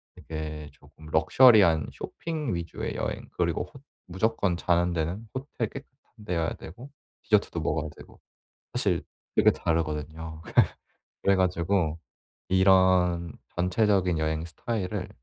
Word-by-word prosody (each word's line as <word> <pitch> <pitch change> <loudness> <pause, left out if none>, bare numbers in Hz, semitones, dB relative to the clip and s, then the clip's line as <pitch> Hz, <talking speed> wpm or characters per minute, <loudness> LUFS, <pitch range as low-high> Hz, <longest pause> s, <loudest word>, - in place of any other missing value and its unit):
이게 75 -1 -6
조금 80 0 -17
럭셔리한 85 - +5
쇼핑 155 - -4
위주의 85 -1 -4
여행 - - -3
그리고 - - 0
호 135 - -15 0.3
무조건 95 0 0
자는 85 0 +2
데는 85 +7 -3
호텔 130 -4 -3
깨끗한 130 -5 -13
데여야 85 -4 -1
되고 120 - -11 0.3
디저트도 105 -5 +2
먹어야 75 0 -1
되고 - - -15 0.5
사실 - - 0 0.3
되게 - - +6
다르거든요. 80 0 -2
그래 - - -11 0.7
그래 100 0 +4
가지고 90 -2 +1 0.5
이런 95 -3 +4 0.2
전체적인 90 -1 +2
여행 80 +1 -1
스타일을 90 +4 -3
90 Hz, 290 characters per minute, -27 LUFS, 80-105 Hz, 0.7 s, 되게